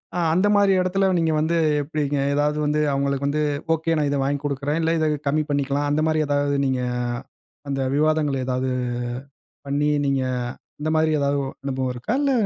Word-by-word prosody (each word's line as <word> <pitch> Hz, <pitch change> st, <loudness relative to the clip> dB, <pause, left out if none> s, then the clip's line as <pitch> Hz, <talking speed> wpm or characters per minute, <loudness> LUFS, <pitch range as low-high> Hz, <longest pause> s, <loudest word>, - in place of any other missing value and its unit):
அ, -, -, 0 dB
அந்த 185 Hz, +4 st, +3 dB
மாரி 200 Hz, -1 st, +4 dB
இடத்துல 190 Hz, +1 st, +1 dB
நீங்க 165 Hz, -1 st, +2 dB
வந்து 165 Hz, +2 st, +1 dB, 0.2 s
எப்டிங்க? 145 Hz, -1 st, -2 dB, 0.2 s
ஏதாவது 150 Hz, +1 st, +1 dB
வந்து 150 Hz, +1 st, +1 dB
அவங்களுக்கு 140 Hz, 0 st, 0 dB
வந்து, 150 Hz, +2 st, 0 dB, 0.3 s
"ஒகே 165 Hz, +1 st, 0 dB
நான் 150 Hz, -1 st, +1 dB
இத 140 Hz, -, 0 dB
வாங்கிக் 140 Hz, +1 st, -1 dB
குடுக்குறேன். 145 Hz, +3 st, -1 dB
இல்ல, 165 Hz, +1 st, +1 dB
இத 155 Hz, -1 st, +1 dB, 0.2 s
கம்மி 150 Hz, +2 st, +2 dB
பண்ணிக்கலா" 140 Hz, 0 st, 0 dB
அந்த 150 Hz, +1 st, +1 dB
மாரி 155 Hz, 0 st, +1 dB
ஏதாவது 145 Hz, 0 st, +1 dB
நீங்க 130 Hz, -1 st, 0 dB, 0.9 s
அந்த 135 Hz, -1 st, -1 dB
விவாதங்கள 150 Hz, -2 st, +2 dB
ஏதாவது 130 Hz, 0 st, -1 dB, 1.0 s
பண்ணி, 145 Hz, +1 st, +1 dB, 0.2 s
நீங்க 135 Hz, -1 st, +1 dB, 0.6 s
அந்த 155 Hz, -, -2 dB
மாரி 155 Hz, 0 st, +3 dB
ஏதாவது 140 Hz, 0 st, +1 dB, 0.2 s
அனுபவம் 130 Hz, -2 st, -2 dB
இருக்கா? 125 Hz, -, -3 dB
இல்ல 280 Hz, -1 st, +2 dB
145 Hz, 170 wpm, -23 LUFS, 140-155 Hz, 1.0 s, மாரி